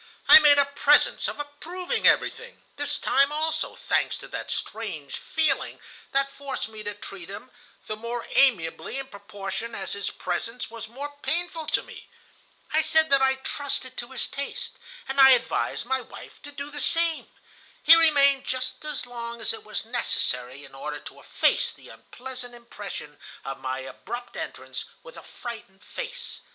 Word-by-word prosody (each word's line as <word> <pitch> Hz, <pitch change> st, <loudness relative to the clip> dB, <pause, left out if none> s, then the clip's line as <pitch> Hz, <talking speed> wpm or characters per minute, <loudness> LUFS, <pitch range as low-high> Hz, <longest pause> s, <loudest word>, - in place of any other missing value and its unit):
I -, -, +12 dB
made 295 Hz, -2 st, +7 dB
a 285 Hz, -, +6 dB
presence 285 Hz, +1 st, +4 dB
of -, -, -4 dB
approving 320 Hz, +5 st, -1 dB
everything, 475 Hz, +1 st, +2 dB
this 290 Hz, 0 st, 0 dB
time 275 Hz, +1 st, +3 dB
also, 310 Hz, +1 st, -1 dB
thanks -, -, +1 dB
to -, -, -10 dB
that -, -, -5 dB
strange 195 Hz, -11 st, -4 dB
feeling 310 Hz, -4 st, 0 dB, 0.3 s
that 275 Hz, 0 st, +1 dB
forced 275 Hz, -3 st, -4 dB
me 220 Hz, -1 st, -9 dB
to 205 Hz, -1 st, -5 dB
treat 195 Hz, -3 st, -9 dB
him 240 Hz, +6 st, -8 dB, 0.3 s
the 215 Hz, -, -3 dB
more 235 Hz, +2 st, -4 dB
amiably 215 Hz, -7 st, +2 dB
in 270 Hz, 0 st, -5 dB
proportion 200 Hz, +2 st, -6 dB
as 190 Hz, -, -4 dB
his 200 Hz, -1 st, -2 dB
presence 225 Hz, +8 st, -3 dB
was 230 Hz, -1 st, -7 dB
more 285 Hz, +5 st, -7 dB
painful 335 Hz, -1 st, -2 dB
to -, -, +1 dB
me. -, -, -12 dB, 0.6 s
I 315 Hz, -, +5 dB
said 315 Hz, -1 st, +3 dB
that 275 Hz, -1 st, +6 dB
I 265 Hz, 0 st, +4 dB
trusted 275 Hz, -2 st, -3 dB
to 240 Hz, -, -3 dB
his 260 Hz, -1 st, -3 dB
taste, 280 Hz, 0 st, -6 dB, 0.3 s
and 270 Hz, +1 st, -2 dB
I 265 Hz, 0 st, +10 dB
advised 240 Hz, -, -2 dB
my 260 Hz, +1 st, 0 dB
wife 235 Hz, -, -12 dB
to 290 Hz, -, -8 dB
do 285 Hz, +1 st, -6 dB
the 290 Hz, 0 st, -3 dB
same. 330 Hz, +2 st, +1 dB, 0.6 s
He 330 Hz, -, +11 dB
remained 280 Hz, -4 st, +5 dB
just 255 Hz, +1 st, -3 dB
as 300 Hz, -3 st, -4 dB
long 235 Hz, -1 st, -6 dB
as 225 Hz, -, -1 dB
it -, -, -9 dB
was 215 Hz, +1 st, -4 dB
necessary 140 Hz, -, -1 dB
in 135 Hz, -, -15 dB
order 150 Hz, +2 st, -5 dB
to -, -, -11 dB
efface -, -, +2 dB
the -, -, -15 dB
unpleasant 250 Hz, -1 st, -8 dB
impression 205 Hz, -10 st, -8 dB, 0.3 s
of 135 Hz, -, -5 dB
my 130 Hz, 0 st, -3 dB
abrupt 240 Hz, -, -7 dB
entrance -, -, -5 dB, 0.2 s
with -, -, -12 dB
a -, -, -9 dB
frightened 210 Hz, -5 st, -9 dB
face. 485 Hz, -, -6 dB
255 Hz, 170 wpm, -26 LUFS, 215-290 Hz, 0.6 s, I